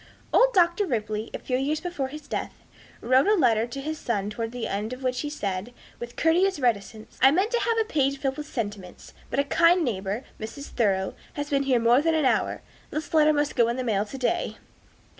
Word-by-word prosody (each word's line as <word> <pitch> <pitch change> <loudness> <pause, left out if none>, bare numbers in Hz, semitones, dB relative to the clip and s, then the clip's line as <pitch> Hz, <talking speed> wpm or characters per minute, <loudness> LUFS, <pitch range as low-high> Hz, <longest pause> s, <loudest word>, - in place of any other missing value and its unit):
Old - - +5
Dr. 350 +2 +3
Ripley, 215 -4 -2
a - - -4
few 255 - -2
years 290 +4 0
before 345 -6 -3
his 295 +2 -10
death, - - -4 0.5
wrote 260 +7 +3
a 425 - +5
letter 235 - +3
to 245 +3 -7
his 310 +2 -4
son, 205 -3 -2
towards 225 +1 -4
the 245 -1 -4
end 210 +4 -3
of 255 +1 -9
which 250 -1 0
he 295 - -3
said, 205 -4 -4 0.2
with 240 0 -7
courteous 355 +2 +2
reticence, 220 -3 -2
"I 265 - +8
meant 380 +10 +1
to 480 - +2
have - - -1
filled 460 -1 +1
a 280 -7 +1
page - - -20
with 300 0 -6
sentiments. 205 -8 -6 0.2
But 235 - -3
a 280 - +4
kind 335 +4 +4
neighbor, 205 +1 -2 0.2
Mrs. 230 +6 -7
Thoreau, 195 -5 0 0.2
has 290 0 -5
been 275 -1 +2
here 255 - +4
more 235 +3 +4
than 325 +1 +2
an 310 -3 +2
hour. - - +1 0.3
This 310 +1 -5
letter 310 -1 +5
must 295 -1 0
go 235 -2 +4
in 235 - -1
the 255 - -2
mail 210 -4 +1
to 245 +6 -8
day." 340 +7 -1
260 Hz, 220 wpm, -26 LUFS, 225-310 Hz, 0.5 s, I